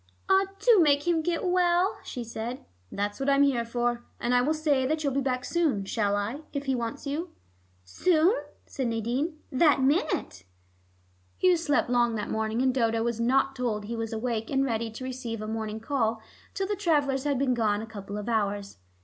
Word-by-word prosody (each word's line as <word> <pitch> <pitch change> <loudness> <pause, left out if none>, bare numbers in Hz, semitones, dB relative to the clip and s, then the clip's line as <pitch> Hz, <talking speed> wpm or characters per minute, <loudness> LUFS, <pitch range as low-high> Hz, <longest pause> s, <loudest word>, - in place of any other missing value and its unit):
"Ah, 385 0 +4
do 430 +1 +5
make 290 -1 +3
him 335 -2 +3
get 340 +3 -1
well," 360 +1 +2
she 245 - -5
said. 230 +2 -6 0.3
"That's 205 +3 -3
what 270 +1 0
I'm 280 0 +5
here 265 -4 +2
for. 240 +1 -1 0.2
And 240 - 0
I 245 - +5
will 300 +5 +1
say 295 -4 +1
that 310 +2 -1
you'll 280 -2 0
be 275 - +1
back 255 -1 -1
soon, 300 - 0
shall 205 0 0
I, 210 +8 -2
if 280 -1 -3
he 270 - +1
wants 240 +3 -3
you?" 305 +6 -3 0.5
"Soon?" 325 - +3 0.3
said 260 -3 -3
Nadine. 240 +8 -1
"That 275 0 +4
minute." 285 - 0 0.9
Hugh 365 -1 +4
slept 295 -6 +1
long 240 -2 +3
that 210 -1 -3
morning, 220 +2 0
and 260 -1 +3
Dodo 230 -3 +1
was 235 -1 -1
not 270 +3 +2
told 225 -5 -2
he 230 +2 -4
was 225 -1 -3
awake 225 -1 -2
and 270 0 +1
ready 230 -2 -1
to 225 +4 -8
receive 250 -3 -5
a 215 - -5
morning 220 0 -3
call 225 -2 0 0.4
till 390 - -1
the 410 +2 -1
travelers 290 -8 +1
had 285 -2 +1
been 260 -1 +2
gone 215 -3 +1
a - - -5
couple 205 -2 -7
of 210 - -5
hours. 205 - -1
250 Hz, 200 wpm, -27 LUFS, 225-290 Hz, 0.9 s, do